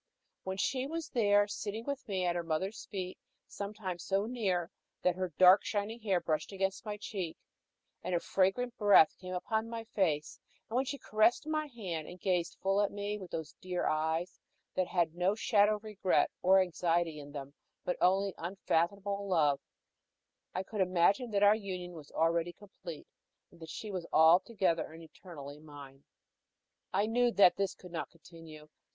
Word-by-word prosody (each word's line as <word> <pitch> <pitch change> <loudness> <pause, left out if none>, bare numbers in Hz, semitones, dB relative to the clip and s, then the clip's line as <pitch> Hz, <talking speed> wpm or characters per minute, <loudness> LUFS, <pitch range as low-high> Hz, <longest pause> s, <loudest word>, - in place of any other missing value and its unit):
When 190 0 -4
she 255 +6 0
was 325 0 -4
there, 205 -3 +3
sitting 210 +2 -5
with 280 -2 -4
me 190 -3 -1
at 175 -1 +1
her 175 - 0
mother's 170 +6 -3
feet, 185 -2 -5 0.3
sometimes 200 -4 -5
so 195 +1 0
near 195 -7 -1 0.3
that 180 -1 +3
her 185 -1 -3
dark, 185 +2 +8
shining 220 +1 -2
hair 200 -5 +1
brushed 160 0 -2
against 195 +1 -2
my 210 0 -3
cheek, 195 -5 -5 0.6
and 180 0 -2
her - - +2
fragrant 195 +8 +1
breath 205 -7 +6
came 185 0 -4
on 220 +1 +1
my 230 -1 -5
face; 180 -9 -1 0.3
and 225 - -6
when 260 +2 +2
she 280 - -3
caressed 215 +1 +2
my 310 -1 -1
hand, 185 - -5
and 180 - -10
gazed 180 -2 0
full 195 +1 +3
at 205 - +1
me 205 +1 -3
with 185 -3 -9
those 160 -2 -5
dear 180 -1 -2
eyes 160 +3 -1 0.3
that 185 -1 0
had 170 -3 +1
no 180 +4 +1
shadow 210 -1 +3
of 210 - -10
regret 210 -3 +1
or 190 +1 +6
anxiety 170 -3 0
in 145 0 -10
them, 140 -1 -7 0.3
but 180 - 0
only 195 +2 +3
unfathomable 200 +3 -1
love, 150 -7 +3 1.0
I 185 - -1
could 210 +1 -3
imagine 185 +6 +3
that 205 -1 +1
our 205 0 +8
union 185 -4 -5
was 155 -4 -11
already 165 +1 +1
complete, 185 -6 -10 0.5
that 165 -2 -12
she 210 +6 -6
was 180 -3 -4
altogether 170 +1 +4
and 165 +1 -11
eternally 150 -3 -10
mine. 140 -3 -12 0.9
I 200 +2 +2
knew 240 +2 +2
that 195 -3 +6
this 195 -1 -1
could 180 - -13
not 170 - -4
continue. 165 -2 -13
185 Hz, 170 wpm, -32 LUFS, 170-205 Hz, 1.0 s, dark